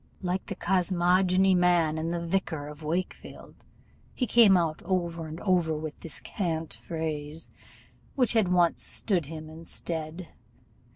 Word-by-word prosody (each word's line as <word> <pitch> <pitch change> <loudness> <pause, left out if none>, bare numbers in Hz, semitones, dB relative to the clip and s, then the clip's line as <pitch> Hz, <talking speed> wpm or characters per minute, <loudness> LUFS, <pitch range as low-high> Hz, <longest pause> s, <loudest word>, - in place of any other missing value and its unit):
Like 180 +1 -2
the - - -4
cosmogony 185 +1 +3
man 175 -3 +3
in 160 +1 -2
the 170 0 -2
Vicar 165 -5 -1
of 150 +1 -11
Wakefield, 170 +4 -4 0.6
he 255 - 0
came 220 -4 +6
out 165 -3 0
over 170 -3 -2
and 155 +2 -7
over 175 -5 +2
with 155 0 -6
this 165 - -4
cant 165 -5 -3
phrase, 160 -1 -4 0.7
which 250 -4 +3
had 215 -6 +3
once 175 -2 +3
stood 180 -9 -1
him 155 0 -7
in 160 +1 -11
stead. 165 +1 -5
170 Hz, 140 wpm, -28 LUFS, 160-185 Hz, 0.7 s, came